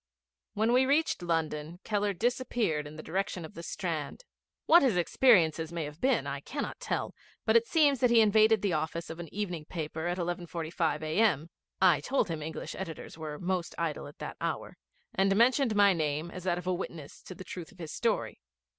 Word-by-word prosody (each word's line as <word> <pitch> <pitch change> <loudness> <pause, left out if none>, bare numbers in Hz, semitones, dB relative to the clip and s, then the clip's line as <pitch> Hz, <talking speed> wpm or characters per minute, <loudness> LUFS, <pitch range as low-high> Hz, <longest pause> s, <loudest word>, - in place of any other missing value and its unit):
When 220 +3 +2
we 260 +1 +4
reached 295 - +2
London 165 -1 -2
Keller 205 -1 0
disappeared 225 - -1
in 150 - -10
the 155 - -8
direction 190 0 -2
of 155 - -11
the 170 - -8
Strand. 170 - -4 0.4
What 340 +2 +7
his 245 -9 +2
experiences 170 - +4
may 170 -1 -3
have 150 +2 -9
been 265 +1 +2
I - - -3
cannot - - -5
tell, - - -2 0.3
but - - +3
it 465 0 +5
seems 290 -5 +3
that 250 - +4
he 235 -1 +6
invaded 215 0 +5
the 195 -4 +1
office 160 +2 -2
of 165 - -8
an 170 -3 -7
evening 180 -6 -4
paper 160 0 -4
at 175 +1 -1
11.45 170 -2 -2
a.m. 160 -1 +1 0.3
(I 175 -6 +5
told 265 - 0
him 160 -2 -3
English 160 +1 -5
editors 170 -5 -7
were 155 -2 -6
most 180 0 -2
idle 160 -3 -2
at 145 - -13
that - - -7
hour), - - -3 0.4
and 195 -2 +2
mentioned 240 +1 +3
my 200 -1 +6
name 155 0 -2
as 185 0 -8
that 175 -2 +1
of 180 - -6
a 185 - +1
witness 170 -5 -6
to 185 - -10
the 185 - -9
truth 175 -3 -8
of 195 - -20
his 165 -4 -7
story. - - -1
175 Hz, 200 wpm, -30 LUFS, 160-215 Hz, 0.4 s, What